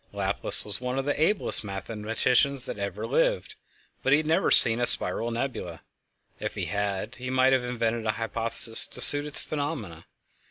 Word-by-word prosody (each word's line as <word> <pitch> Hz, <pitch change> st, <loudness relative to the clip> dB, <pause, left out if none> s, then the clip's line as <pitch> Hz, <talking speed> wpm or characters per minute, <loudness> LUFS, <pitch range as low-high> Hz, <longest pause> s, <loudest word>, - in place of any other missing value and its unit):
Laplace -, -, -3 dB
was 105 Hz, +3 st, -3 dB
one 125 Hz, +1 st, -5 dB
of 135 Hz, -, -3 dB
the 145 Hz, +1 st, -3 dB
ablest 190 Hz, -, 0 dB
mathematicians 115 Hz, +6 st, -1 dB
that -, -, -8 dB
ever 100 Hz, 0 st, -6 dB
lived, -, -, -2 dB, 0.5 s
but 135 Hz, -, -2 dB
he 145 Hz, -, +5 dB
had 155 Hz, -, -4 dB
never 160 Hz, +1 st, 0 dB
seen 115 Hz, 0 st, +6 dB
a 120 Hz, -, +6 dB
spiral 115 Hz, -, +6 dB
nebula; 115 Hz, -, -6 dB, 0.6 s
if -, -, -6 dB
he -, -, -5 dB
had, 100 Hz, +2 st, -5 dB
he 125 Hz, 0 st, -8 dB
might 130 Hz, +1 st, +1 dB
have 130 Hz, -2 st, 0 dB
invented 115 Hz, -2 st, -4 dB
a 110 Hz, -, -1 dB
hypothesis 115 Hz, 0 st, +1 dB
to -, -, -6 dB
suit 145 Hz, 0 st, +5 dB
its 150 Hz, -, -3 dB
phenomena. 140 Hz, -, -7 dB
120 Hz, 175 wpm, -25 LUFS, 110-140 Hz, 0.6 s, seen